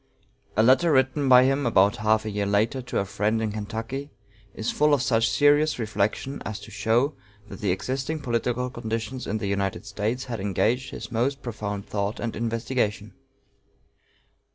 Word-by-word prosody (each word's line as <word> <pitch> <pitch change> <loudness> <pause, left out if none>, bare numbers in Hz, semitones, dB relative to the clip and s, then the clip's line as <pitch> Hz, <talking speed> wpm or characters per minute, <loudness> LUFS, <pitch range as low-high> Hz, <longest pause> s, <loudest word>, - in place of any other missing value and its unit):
A 110 - +5
letter 135 +8 +5
written 130 0 +2
by 125 0 +8
him 135 +2 +2
about 100 -3 +4
half 110 0 +2
a 110 - -3
year 100 0 -1
later 110 +6 +1
to 125 - -4
a 100 - +1
friend 105 +3 0
in 110 -1 -1
Kentucky, 115 +7 -5 0.5
is 110 - -2
full 150 0 +4
of 130 - -1
such 115 -2 +2
serious 145 +3 +3
reflection 110 +4 -2
as 110 -1 -5
to 100 - -11
show 120 +7 +1 0.4
that - - -9
the 100 - 0
existing 130 - -2
political 125 -1 -1
conditions 120 +2 -4
in 110 - -1
the 105 - -4
United 100 0 -2
States 105 +5 -2
had 115 -3 -5
engaged 110 +6 0
his - - -8
most 130 +4 -1
profound 105 -4 -4
thought 100 +1 -2
and 115 -1 -3
investigation. 115 -2 -2
115 Hz, 170 wpm, -25 LUFS, 105-130 Hz, 0.5 s, by